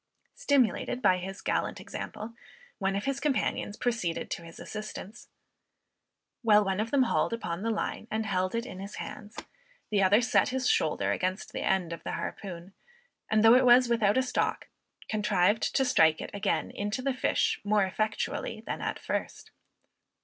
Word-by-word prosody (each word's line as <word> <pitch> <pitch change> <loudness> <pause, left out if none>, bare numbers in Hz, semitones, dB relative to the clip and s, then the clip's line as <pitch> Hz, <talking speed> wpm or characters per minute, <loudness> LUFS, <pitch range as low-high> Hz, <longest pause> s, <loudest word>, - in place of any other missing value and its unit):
Stimulated 255 -3 +1
by 185 -6 +3
his 190 +2 -7
gallant - - -1
example, 220 +2 -7 0.5
one 195 -1 0
of 200 - -2
his 275 0 -1
companions 265 -7 -1
proceeded 225 -9 -2
to - - -3
his 165 0 -12
assistance. 215 0 -8 1.1
While 210 -3 +5
one 190 0 -1
of 220 +2 -1
them 275 0 +4
hauled 235 - +1
upon 185 -6 -3
the 225 - -1
line 220 0 -3
and 220 0 -1
held 185 -1 -1
it 230 +1 -1
in 190 -8 -8
his 200 +2 -7
hands, 210 +1 -8 0.5
the 205 -2 +3
other 195 +3 +5
set 240 - +2
his 260 0 -1
shoulder 100 -10 +1
against 185 - -2
the - - -3
end 180 -3 0
of 165 - -8
the - - -4
harpoon, 185 -1 -6 0.6
and 215 0 +3
though 225 +1 +8
it 255 +1 +6
was 245 0 +6
without 220 -2 +3
a 260 - +3
stock, 255 - -1 0.4
contrived 210 -1 +1
to 265 - +3
strike 160 -11 +4
it - - -6
again 200 - -1
into 210 +5 -3
the 275 0 +1
fish 255 - 0
more 205 -1 +3
effectually 215 - -2
than - - -4
at - - -2
first! - - -4
210 Hz, 170 wpm, -29 LUFS, 190-235 Hz, 1.1 s, though